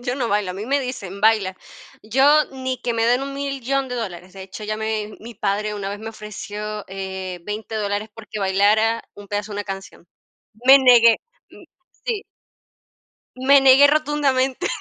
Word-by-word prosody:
yo 245 +1 -2
no 245 -4 -2
bailo, 205 -2 0
a - - -10
mí 205 +3 -6
me 280 +3 +2
dicen: 200 -7 -6
"Baila". 210 -3 +2 0.5
Yo 275 +7 +4
ni 260 -1 -4
que 240 -1 -2
me 225 - 0
den 245 +3 +2
$1000000 275 -1 -2
de 250 - -4
dólares. 185 -5 -6
De 190 0 -9
hecho, 190 +3 -10
ya 215 0 -3
me 215 -1 -3
mi 235 +2 -10
padre 210 +1 -1
una 200 -1 -4
vez 205 - -6
me 220 +1 -7
ofreció, 210 0 -7
eh, 190 -1 -6
20 215 +2 -6
dólares 205 0 -2
porque 220 -1 -8
bailara 210 +4 +2
un 205 - -12
pedazo 205 +1 -4
de 205 - -5
una 205 - -3
canción. 195 -3 -8 0.6
Me 270 +1 +10
negué 240 -4 +6 0.3
mm, - - -15 0.4
sí. 450 -5 -2 1.1
Me 275 +2 +5
negué 270 +1 +7
rotundamente. 285 -3 +1
220 Hz, 175 wpm, -21 LUFS, 205-260 Hz, 1.1 s, Me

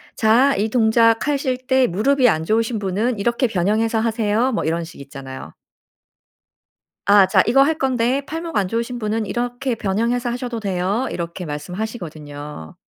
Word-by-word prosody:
"자 240 +5 +4
이 210 +3 0
동작하실 250 +4 +2
때 260 -1 +3
무릎이 250 +8 +2
안 160 -5 0
좋으신 225 +4 0
분은 210 +4 -1
이렇게 235 +4 +1
변형해서 220 +4 0
하세요." 225 +2 +1
뭐 220 - -1
이런 165 +1 -1
식 165 -2 -11
있잖아요. 135 - -9 1.5
아. 200 0 +6
"자 185 0 +3
이거 270 +4 +5
할건데 265 -3 +1
팔목 325 +2 -6
안 195 -2 +1
좋으신 235 +4 -3
분은 215 0 -1
이렇게 245 +3 -2
변형해서 230 +4 -1
하셔도 240 -1 -4
돼요." 195 +5 -1
이렇게 170 +1 -5
말씀하시거든요. 150 - -7
225 Hz, 330 characters per minute, -20 LUFS, 185-245 Hz, 1.5 s, 아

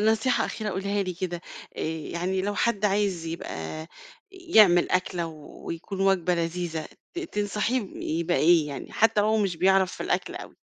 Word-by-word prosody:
نصيحة 220 +4 +2
أخيرة 215 -2 -3
قُليها 200 +2 -1
لي 185 -2 -4
كده 175 -1 -4 0.4
آآ، - - -4
يعني 170 +4 -2
لو 205 +1 -1
حد 215 -2 0
عايز 195 -4 +1
يبقى 155 - -5 0.4
يعمل 220 - +5
أكلة 180 -2 0
ويكون 165 +4 -7
وجبة 190 -2 +3
لذيذة 170 -1 -2 0.3
ت - - -4
تنصحيه 210 - -1 0.4
يبقى 170 +1 +1
إيه، 165 -1 +5
يعني 140 - -7
حتى 220 -1 +3
وهو 215 +1 +3
مش 195 -5 0
بيعرف 190 +1 +3
في - - -6
الأكل - - -1
أوي؟ - - -9
185 Hz, 155 wpm, -26 LUFS, 170-210 Hz, 0.4 s, يعمل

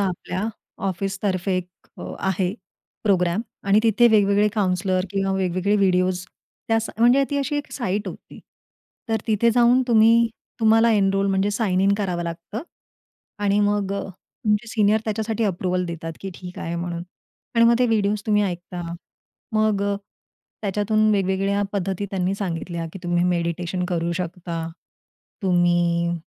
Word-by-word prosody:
आपल्या 185 0 -2 0.4
ऑफिसतर्फे 190 0 -1
एक 180 -1 -3 0.3
अ, - - -7 0.2
आहे 190 -1 0 0.5
प्रोग्राम 180 -1 +2 0.3
आणि 200 +2 +5
तिथे 230 +1 +5
वेगवेगळे 205 -1 +4
काउंसलर 185 -2 +1
किंवा 195 -1 0
वेगवेगळे 190 +2 +1
व्हिडिओज 185 -2 +2 0.4
त्यास 225 0 +1
म्हणजे 245 +4 +5
ती 285 - 0
अशी 280 +1 -1
एक 290 - -4
साइट 205 -4 -2
होती. - - -11 0.7
तर 225 0 0
तिथे 225 +1 +3
जाऊन 245 +2 +4
तुम्ही 230 +1 +5 0.3
तुम्हाला 225 +1 +5
एनरोल 195 -1 +2
म्हणजे 195 +1 +1
साइन 200 -3 0
इन 200 +1 +4
करावं 180 -4 -1
लागतं 170 - -5 0.8
आणि 205 0 +3
मग 205 -1 +1
अ, 200 - -1 0.4
तुमचे 210 +2 +1
सीनियर 215 -1 +2
त्याच्यासाठी 220 +1 -1
अप्रूव्हल 180 -1 0
देतात 165 -1 -5
की 195 - -5
ठीक 180 -1 -9
आहे 170 +1 -4
म्हणून. 170 0 -4 0.5
आणि 230 0 +5
मग 235 0 +6
ते 250 - +4
व्हिडिओज 210 -2 +1
तुम्ही 210 -1 +3
ऐकता. 175 -1 -4 0.7
मग 215 -2 +2
अ, 200 0 0 0.7
त्याच्यातून 215 +2 +2
वेगवेगळ्या 195 +1 +1
पद्धती 195 0 -2
त्यांनी 190 0 0
सांगितल्या 170 -3 -4
की 195 - -8
तुम्ही 175 0 +1
मेडिटेशन 175 +1 -1
करू 170 -1 -1
शकता. 170 -2 -4 0.8
तुम्ही 175 -1 +2
195 Hz, 140 wpm, -23 LUFS, 180-215 Hz, 0.8 s, मग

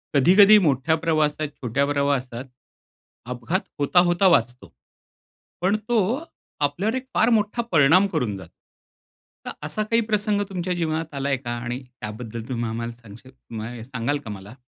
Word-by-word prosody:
कधी-कधी 195 +9 +7
मोठ्या 145 +2 +2
प्रवासात 155 -2 0
छोट्या 130 +3 0
प्रवासात 140 -3 -1 0.8
अपघात 125 +9 -1 0.2
होता, 145 +5 +3
होता 175 +2 +3
वाचतो. 125 -8 +1 0.9
पण 190 +3 +2
तो 225 - 0 0.4
आपल्यावर 195 - -2
एक 260 0 -4
फार 225 - +3
मोठा 220 +1 +1
परिणाम 165 +6 +5
करून 125 - -2
जातो. 90 -3 -12 0.9
तर - - -4 0.2
असा 215 +7 -2
काही 230 +2 +1
प्रसंग 210 -1 0
तुमच्या 180 -1 -2
जीवनात 160 -2 -2
आलाय 140 0 0
का? 125 -2 -6
आणि 120 +2 -4
त्याबद्दल 115 -2 -8
तुम्ही 120 -2 -2
आम्हाला 115 +1 -4
सांगशील 115 +2 -14 0.3
माय 115 +1 -6
सांगाल 125 +3 -2
का - - -7
मला? 100 +3 -10
145 Hz, 145 wpm, -23 LUFS, 120-185 Hz, 0.9 s, कधी-कधी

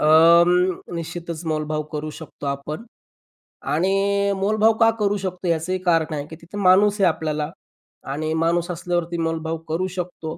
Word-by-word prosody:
अं, 170 +3 +5
निश्चितच 170 0 -5
मोलभाव 155 -1 -1
करू 155 0 -4
शकतो 155 -2 -9
आपण 140 +8 -4 0.9
आणि 180 +6 +2 0.4
मोलभाव 215 +3 +3
का 225 -1 +6
करू 205 0 +1
शकतो 185 -2 -4
याचं 170 +2 0
कारण 165 -3 +2
आहे, 145 -1 -3
की 160 - -9
तिथं 175 +5 -8
माणूस 200 +3 +5
आहे 190 - +6
आपल्याला 155 -2 -1 0.6
आणि 155 +2 -2
माणूस 170 +1 +1
असल्यावरती 175 0 -2
मोलभाव 165 0 -2
करू 175 +4 0
शकतो 170 -2 -5
170 Hz, 145 wpm, -22 LUFS, 155-185 Hz, 0.9 s, का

